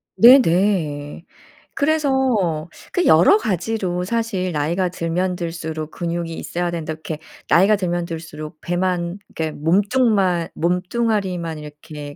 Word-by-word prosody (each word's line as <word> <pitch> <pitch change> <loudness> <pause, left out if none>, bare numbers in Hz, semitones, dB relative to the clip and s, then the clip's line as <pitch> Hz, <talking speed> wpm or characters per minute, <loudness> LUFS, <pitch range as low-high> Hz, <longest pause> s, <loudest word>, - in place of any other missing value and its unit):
네네. 175 - +4 0.5
그래서 265 - +1 0.2
그 360 - +1
여러 410 - +6
가지로 185 - -2
사실 200 -4 -1
"나이가 170 +5 0
들면 180 +2 -1
들수록 160 -2 -5
근육이 170 -1 -3
있어야 175 0 -3
된다." 160 -2 -4
이렇게 155 0 -6 0.3
나이가 195 +5 +5
들면 175 -3 -2
들수록 160 -1 -8
배만 175 0 -1
이렇게 160 -1 -3
몸뚱만 195 - +2
몸뚱아리만 180 -2 -1
이렇게 150 -1 -9
175 Hz, 275 characters per minute, -21 LUFS, 165-200 Hz, 0.5 s, 여러